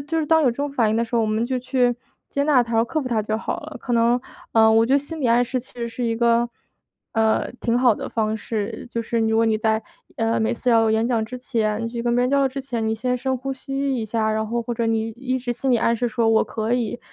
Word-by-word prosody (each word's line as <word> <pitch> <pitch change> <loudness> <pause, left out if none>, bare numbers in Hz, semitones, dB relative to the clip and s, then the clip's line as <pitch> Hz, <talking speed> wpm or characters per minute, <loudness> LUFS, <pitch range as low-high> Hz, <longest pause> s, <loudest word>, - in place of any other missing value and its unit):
就 325 +2 -1
是 310 - 0
当 320 +1 +4
有 255 - +4
这 235 - -8
种 285 0 -2
反 235 -6 +2
应 215 - +1
的 230 - +1
时 235 - -7
候， 235 - +3
我 220 - +1
们 215 +2 0
就 255 +1 -1
去 250 -1 +1 0.4
接 280 - 0
纳 285 -5 +4
它、 230 -1 +1
克 305 +6 -2
服 255 - -4
它 230 -3 +1
就 215 +1 -2
好 - - -4
了。 - - -9
可 245 - -5
能， 235 +1 +3 0.3
呃， 220 -1 +5
我 225 +1 +4
觉 265 - +3
得 - - +5
心 310 +3 -7
里 265 - +1
暗 240 +1 +4
示 255 +1 -2
其 255 - -21
实 235 -1 -4
是 230 +2 -5
一 230 -1 0
个， 235 0 +3 0.6
呃， 220 -1 +1
挺 235 0 +1
好 245 -3 +4
的 - - -6
方 220 -1 -1
式， 220 +1 -4
就 230 - -2
是 230 +1 -2
如 220 0 +2
果 230 - +4
你 220 -1 +2
在， 220 0 +1 0.3
呃， 225 -2 +1
每 220 +2 +1
次 245 +2 -3
要 225 -1 +4
演 220 +1 +2
讲 235 -3 +1
之 250 +3 -7
前 225 -4 -1
你 - - -2
去 235 0 -4
跟 240 0 +1
别 245 - +3
人 250 - +1
交 280 - +3
流 270 - +3
之 270 +1 -5
前， 235 -4 -3
你 220 - +1
先 250 +3 -1
深 260 +1 -1
呼 270 +2 -4
吸 275 +1 -2
一 230 - -2
下， 220 0 0
然 220 0 -1
后 235 +2 -2
或 240 - -4
者 235 - -1
你 225 0 0
一 255 +3 -3
直 245 -1 -3
心 265 +3 -1
里 245 - +5
暗 230 +1 +2
示 245 +1 0
说 230 0 +1
“我 225 0 +4
可 220 +1 -3
以” 240 -1 -2
235 Hz, 315 characters per minute, -22 LUFS, 225-255 Hz, 0.6 s, 呃